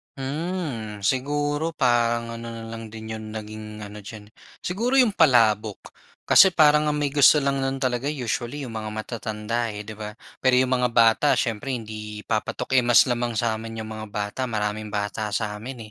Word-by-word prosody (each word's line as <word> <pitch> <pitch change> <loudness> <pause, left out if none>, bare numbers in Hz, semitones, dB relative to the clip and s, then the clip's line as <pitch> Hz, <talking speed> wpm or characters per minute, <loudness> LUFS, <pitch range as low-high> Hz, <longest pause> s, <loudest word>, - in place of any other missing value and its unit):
Mhm. 135 - -4
Siguro 145 +6 0
parang 115 -2 +1
ano 115 - -7
na 115 -1 -7
lang 115 -1 -7
din 110 0 -8
'yong 110 -1 -6
naging 110 0 -7 0.2
ano 105 +1 -9
diyan, 105 0 -11 0.3
siguro 230 +9 -1
'yong 250 -5 +5
palabok. 115 - +3 0.4
Kasi 190 0 +7
parang 150 -2 +4
ang 150 - -2
may 145 - +1
gusto 145 +1 +6
lang 140 -1 0
no'n 135 0 -2
talaga 130 +2 -1
usually 125 +1 -3
'yong 115 - -8
mga 110 -1 -4
matatanda, 110 +1 -3
eh, 105 0 -6
'di 110 - -7
ba. 105 0 -6 0.3
Pero 130 -1 +5
'yong 130 - +3
mga 125 -1 +2
bata, 115 +5 +4
siyempre 115 +2 -2
hindi 110 -3 -6
papatok 110 +4 -2
yung 120 -2 +4
mas 120 - +7
lamang 120 -1 0
sa 115 -1 +1
amin 115 0 -7
'yong 110 - -5
mga 110 0 -7
bata, 105 +4 -3
maraming 105 -3 -3
bata 105 +1 -3
sa 105 +1 -2
amin, 115 +1 -8
115 Hz, 180 wpm, -24 LUFS, 110-135 Hz, 0.4 s, Kasi